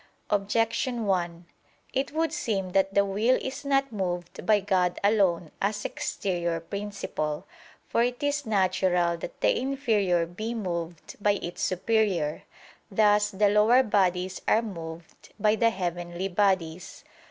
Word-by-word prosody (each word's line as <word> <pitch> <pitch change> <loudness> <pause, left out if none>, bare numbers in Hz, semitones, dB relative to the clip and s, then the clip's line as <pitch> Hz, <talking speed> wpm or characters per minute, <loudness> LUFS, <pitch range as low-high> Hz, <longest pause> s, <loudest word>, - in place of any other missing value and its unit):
Objection 225 +4 0
1: 175 -3 -1 0.5
It 270 +1 -1
would 320 +1 0
seem 205 - -2
that 195 +1 +1
the 200 0 +5
will 215 +6 +2
is 270 +2 -5
not 275 -1 +1
moved 180 -4 -4
by 215 -1 +5
God 185 -3 +1
alone 190 -6 +2
as 205 +1 -1
exterior 175 -3 -2
principle. 185 -5 -4 0.4
For - - +1
it 245 +4 -1
is 285 0 0
natural 185 -4 +2
that - - -8
the - - +3
inferior 220 -10 +1
be 215 +8 -5
moved 170 -5 -5
by 205 0 +4
its 175 -3 -5
superior: 185 -5 +1 0.5
thus 210 0 +3
the 205 0 +2
lower 215 +5 +5
bodies 185 -4 +1
are 225 - +4
moved 165 -5 -9
by 210 +1 +3
the 230 +1 +3
heavenly 175 -1 -3
bodies. 180 -3 0
195 Hz, 135 wpm, -27 LUFS, 175-220 Hz, 0.5 s, the